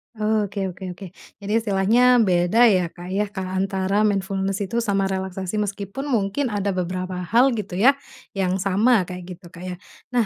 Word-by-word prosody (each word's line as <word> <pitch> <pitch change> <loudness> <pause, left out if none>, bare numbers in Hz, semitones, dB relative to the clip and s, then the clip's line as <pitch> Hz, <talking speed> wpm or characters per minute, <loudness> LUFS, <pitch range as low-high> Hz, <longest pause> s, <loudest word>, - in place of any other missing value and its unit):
Oke 215 -2 -1
oke 180 - -12
oke 195 - -9 0.4
jadi 200 +1 -5
istilahnya 210 +2 +2 0.2
beda 180 +4 +3
ya 185 -4 +2
Kak 175 +1 -9
ya 205 +2 +1 0.3
antara 195 +1 0
mindfulness 195 0 -1
itu 230 +4 -2
sama 200 -4 0
relaksasi 190 +1 -3
meskipun 205 +6 -4
mungkin 235 +2 0
ada 205 -2 -1
beberapa 185 0 -3
hal 240 +9 +3
gitu 210 -5 -4
ya, 225 +9 +6 0.4
yang 190 -2 0
sama 205 +3 +3
kayak 180 0 -8
gitu 180 +1 -20
Kak 175 - -11
ya 180 - -4 0.4
nah, 240 -2 +3
195 Hz, 165 wpm, -22 LUFS, 185-215 Hz, 0.4 s, ya